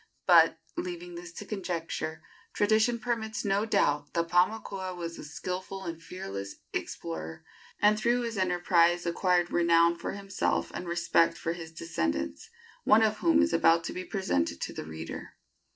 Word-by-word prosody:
But, -, -, +6 dB, 0.2 s
leaving 350 Hz, 0 st, -5 dB
this 355 Hz, +1 st, -8 dB
to 210 Hz, -, -8 dB
conjecture, 170 Hz, -5 st, -4 dB, 0.3 s
tradition 220 Hz, +3 st, +3 dB
permits 225 Hz, -3 st, -3 dB
no 200 Hz, +2 st, +1 dB
doubt 145 Hz, -7 st, +1 dB
that 170 Hz, 0 st, 0 dB
Paumakua 185 Hz, 0 st, +1 dB
was 170 Hz, -1 st, -6 dB
a -, -, -7 dB
skilful 185 Hz, +5 st, -5 dB
and 165 Hz, -2 st, -6 dB
fearless 100 Hz, -, -6 dB, 0.2 s
explorer, 80 Hz, -1 st, -5 dB, 0.3 s
and 210 Hz, +1 st, +4 dB
through 240 Hz, +2 st, +2 dB
his 230 Hz, -1 st, -3 dB
enterprise 175 Hz, -2 st, +3 dB
acquired 175 Hz, 0 st, +1 dB
renown 170 Hz, 0 st, +4 dB
for 170 Hz, -, -5 dB
himself 195 Hz, -, -1 dB
and 180 Hz, -, -5 dB
respect 170 Hz, -1 st, +2 dB
for 165 Hz, -, -2 dB
his 165 Hz, -2 st, -8 dB
descendants, 85 Hz, -, -3 dB, 0.3 s
one 220 Hz, +1 st, +6 dB
of 215 Hz, -1 st, +2 dB
whom 320 Hz, -2 st, +4 dB
is 315 Hz, -, 0 dB
about 165 Hz, 0 st, +4 dB
to -, -, -4 dB
be 185 Hz, -, -4 dB
presented 180 Hz, -, -1 dB
to -, -, -3 dB
the -, -, -6 dB
reader. 80 Hz, +1 st, -7 dB
175 Hz, 155 wpm, -29 LUFS, 165-210 Hz, 0.3 s, But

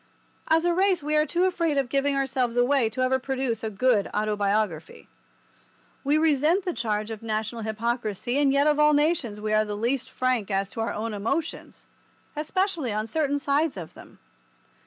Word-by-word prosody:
As 325 Hz, +1 st, +3 dB
a 350 Hz, -, +3 dB
race 375 Hz, -2 st, +2 dB
we 300 Hz, +1 st, -1 dB
are 305 Hz, 0 st, +3 dB
too 350 Hz, +1 st, +1 dB
afraid 335 Hz, -5 st, 0 dB
of 275 Hz, -2 st, +1 dB
giving 275 Hz, +2 st, 0 dB
ourselves 260 Hz, -3 st, -1 dB
away 245 Hz, -1 st, +3 dB
ever 255 Hz, 0 st, +2 dB
to -, -, -10 dB
produce 260 Hz, -4 st, -2 dB
a 220 Hz, -, -1 dB
good 215 Hz, 0 st, +1 dB
autobiography. 205 Hz, -5 st, -1 dB, 1.0 s
We 290 Hz, +2 st, +2 dB
resent 315 Hz, +4 st, +2 dB
the 360 Hz, -, -1 dB
charge 215 Hz, -3 st, -2 dB
of 220 Hz, -, -6 dB
national 220 Hz, +1 st, -3 dB
hypocrisy, 225 Hz, +2 st, -2 dB
and 280 Hz, -2 st, +3 dB
yet 280 Hz, +1 st, +3 dB
of 300 Hz, 0 st, +3 dB
all 300 Hz, 0 st, +5 dB
nations 290 Hz, -8 st, +1 dB
we 215 Hz, 0 st, -2 dB
are 215 Hz, 0 st, +4 dB
the 210 Hz, -1 st, -5 dB
least 255 Hz, +4 st, -1 dB
frank 255 Hz, -6 st, -1 dB
as 195 Hz, 0 st, -1 dB
to 225 Hz, -, -4 dB
our 225 Hz, -, -1 dB
own 225 Hz, +1 st, -4 dB
emotions—especially 310 Hz, -, -4 dB
on 215 Hz, +1 st, -2 dB
certain 285 Hz, +4 st, 0 dB
sides 285 Hz, -1 st, 0 dB
of 170 Hz, -3 st, -8 dB
them. -, -, -15 dB
255 Hz, 180 wpm, -25 LUFS, 215-300 Hz, 1.0 s, all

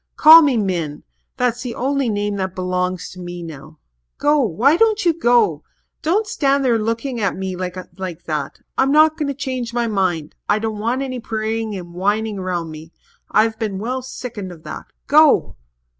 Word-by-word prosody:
Call 320 Hz, +2 st, +10 dB
me 280 Hz, -6 st, +2 dB
Min 170 Hz, -8 st, -2 dB, 0.3 s
that's 245 Hz, -1 st, 0 dB
the 250 Hz, -2 st, -5 dB
only 275 Hz, -1 st, 0 dB
name 205 Hz, -1 st, -1 dB
that 190 Hz, -1 st, -3 dB
belongs 180 Hz, 0 st, -2 dB
to 185 Hz, -, -12 dB
me 175 Hz, -1 st, -7 dB
now. 155 Hz, -1 st, -10 dB, 0.4 s
Go 295 Hz, +1 st, +3 dB
why 245 Hz, -, +3 dB
don't 430 Hz, +1 st, +2 dB
you 340 Hz, -, +4 dB
go? 235 Hz, -, +2 dB, 0.4 s
Don't 390 Hz, +8 st, +1 dB
stand 280 Hz, -7 st, +1 dB
there 235 Hz, -3 st, +3 dB
looking 230 Hz, +3 st, -2 dB
at 195 Hz, -, 0 dB
me 190 Hz, -1 st, -4 dB
like 185 Hz, -1 st, -6 dB
that. 150 Hz, -3 st, -4 dB, 0.2 s
I'm 270 Hz, +1 st, +3 dB
not 310 Hz, +1 st, +5 dB
going 300 Hz, -2 st, -2 dB
to 280 Hz, -, -3 dB
change 255 Hz, -4 st, -4 dB
my 240 Hz, -1 st, +1 dB
mind. 185 Hz, -8 st, -1 dB, 0.2 s
I 205 Hz, -, +4 dB
don't 215 Hz, -1 st, -3 dB
want 240 Hz, +5 st, -1 dB
any 255 Hz, -2 st, -4 dB
praying 220 Hz, -1 st, -3 dB
and 175 Hz, -2 st, -8 dB
whining 205 Hz, +3 st, -1 dB
round 175 Hz, -3 st, -3 dB
me. 155 Hz, +1 st, -10 dB, 0.4 s
I've 220 Hz, +1 st, +2 dB
been 210 Hz, -4 st, -2 dB
well 250 Hz, +6 st, -3 dB
sickened 240 Hz, -6 st, -7 dB
of 165 Hz, -2 st, -13 dB
that. -, -, -7 dB, 0.2 s
Go!" 290 Hz, -, +4 dB
220 Hz, 180 wpm, -20 LUFS, 185-260 Hz, 0.4 s, Call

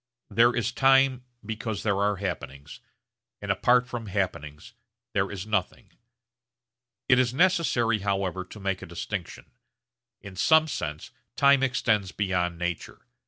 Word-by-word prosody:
There 120 Hz, +1 st, +4 dB
is 120 Hz, 0 st, 0 dB
time 135 Hz, 0 st, +3 dB, 0.2 s
because 110 Hz, -1 st, -4 dB
there 100 Hz, -2 st, +1 dB
are 100 Hz, 0 st, +2 dB
happenings, 75 Hz, -7 st, -6 dB, 0.6 s
and -, -, -2 dB
apart 125 Hz, 0 st, +3 dB
from 120 Hz, -3 st, -6 dB
happenings 90 Hz, -7 st, -4 dB, 0.4 s
there -, -, +1 dB
is 100 Hz, -1 st, -6 dB
nothing. 105 Hz, -4 st, -3 dB, 1.2 s
It 125 Hz, -, +5 dB
is 125 Hz, -1 st, +1 dB
necessary 135 Hz, -, +2 dB
however 95 Hz, -2 st, -2 dB
to 105 Hz, -, -12 dB
make 95 Hz, -1 st, -2 dB
a -, -, -8 dB
distinction. 85 Hz, +2 st, -6 dB, 0.7 s
In 100 Hz, -2 st, -11 dB
some 160 Hz, +10 st, +4 dB
sense 75 Hz, -, -5 dB, 0.2 s
time 140 Hz, -1 st, +5 dB
extends 110 Hz, -7 st, +1 dB
beyond 90 Hz, -4 st, -1 dB
nature. 85 Hz, -1 st, -5 dB
105 Hz, 130 wpm, -26 LUFS, 95-125 Hz, 1.2 s, It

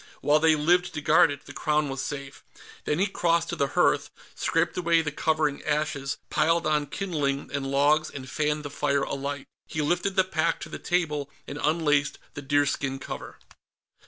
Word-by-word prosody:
While 150 Hz, +1 st, +4 dB
they 160 Hz, 0 st, +5 dB
lived 175 Hz, +3 st, +2 dB
to 150 Hz, -, -3 dB
guard 160 Hz, +3 st, +5 dB
it, 140 Hz, 0 st, -6 dB
the -, -, -10 dB
Crown 150 Hz, -1 st, +1 dB
was 135 Hz, -1 st, -4 dB
safe. 140 Hz, -1 st, -6 dB, 0.4 s
Then 150 Hz, -, 0 dB
he 190 Hz, -, +3 dB
crossed 170 Hz, -4 st, +1 dB
to -, -, -2 dB
the 140 Hz, -, +1 dB
hearth, -, -, +3 dB, 0.2 s
scraped -, -, 0 dB
away 170 Hz, -2 st, +2 dB
the 150 Hz, -, -2 dB
covering 155 Hz, -1 st, 0 dB
ashes, 150 Hz, -2 st, -1 dB
piled 165 Hz, +1 st, +2 dB
on 150 Hz, -1 st, +1 dB
kindling 145 Hz, -6 st, -2 dB
and 135 Hz, -1 st, -2 dB
logs 145 Hz, +3 st, +3 dB
and 130 Hz, -2 st, -8 dB
fanned 150 Hz, +2 st, -1 dB
the 145 Hz, -, -5 dB
fire 140 Hz, -1 st, 0 dB
alight. 140 Hz, 0 st, -4 dB, 0.2 s
He 150 Hz, -, -2 dB
lifted 180 Hz, +5 st, 0 dB
the 190 Hz, -, +5 dB
pack 170 Hz, -2 st, 0 dB
to -, -, -7 dB
the -, -, -7 dB
table 150 Hz, -5 st, -1 dB, 0.2 s
and 145 Hz, -, -6 dB
unlaced 150 Hz, -2 st, +2 dB, 0.2 s
the 145 Hz, -, -6 dB
deerskin 140 Hz, -1 st, 0 dB
cover. 135 Hz, -, -7 dB
150 Hz, 185 wpm, -26 LUFS, 140-165 Hz, 0.4 s, they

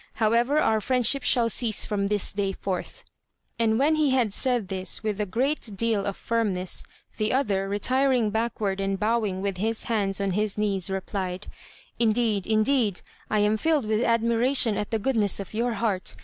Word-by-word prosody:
However, 235 Hz, +6 st, +2 dB
our 220 Hz, -7 st, +2 dB
friendship 255 Hz, +3 st, +2 dB
shall 240 Hz, -3 st, +3 dB
cease 230 Hz, -1 st, +2 dB
from 200 Hz, -2 st, -1 dB
this 205 Hz, -1 st, -2 dB
day 195 Hz, -1 st, -1 dB
forth." 185 Hz, -1 st, -5 dB, 0.6 s
And 220 Hz, -1 st, +2 dB
when 290 Hz, +5 st, +3 dB
he 310 Hz, -2 st, +2 dB
had 250 Hz, -6 st, +1 dB
said 245 Hz, -5 st, 0 dB
this 190 Hz, +2 st, -3 dB
with 210 Hz, -1 st, -2 dB
a 210 Hz, -, -2 dB
great 235 Hz, 0 st, -2 dB
deal 220 Hz, -2 st, 0 dB
of 200 Hz, -, -3 dB
firmness, 200 Hz, -6 st, 0 dB, 0.4 s
the 215 Hz, -1 st, 0 dB
other, 200 Hz, -7 st, 0 dB
retiring 255 Hz, +2 st, +1 dB
backward 215 Hz, -3 st, -2 dB
and 195 Hz, 0 st, -1 dB
bowing 210 Hz, -3 st, 0 dB
with 200 Hz, -2 st, -2 dB
his 220 Hz, +3 st, -2 dB
hands 200 Hz, -4 st, 0 dB
on 200 Hz, -1 st, 0 dB
his 210 Hz, +2 st, -1 dB
knees, 200 Hz, -3 st, 0 dB
replied: 190 Hz, 0 st, -4 dB, 0.5 s
"Indeed, 220 Hz, -3 st, +1 dB
indeed, 220 Hz, -2 st, +1 dB, 0.3 s
I 215 Hz, -, +2 dB
am 210 Hz, +1 st, +2 dB
filled 305 Hz, 0 st, +1 dB
with 215 Hz, +2 st, 0 dB
admiration 230 Hz, +1 st, +2 dB
at 210 Hz, 0 st, -3 dB
the 225 Hz, -, 0 dB
goodness 215 Hz, -4 st, +1 dB
of 200 Hz, 0 st, -7 dB
your 235 Hz, +2 st, 0 dB
heart. 200 Hz, -4 st, -2 dB
215 Hz, 175 wpm, -25 LUFS, 200-235 Hz, 0.6 s, shall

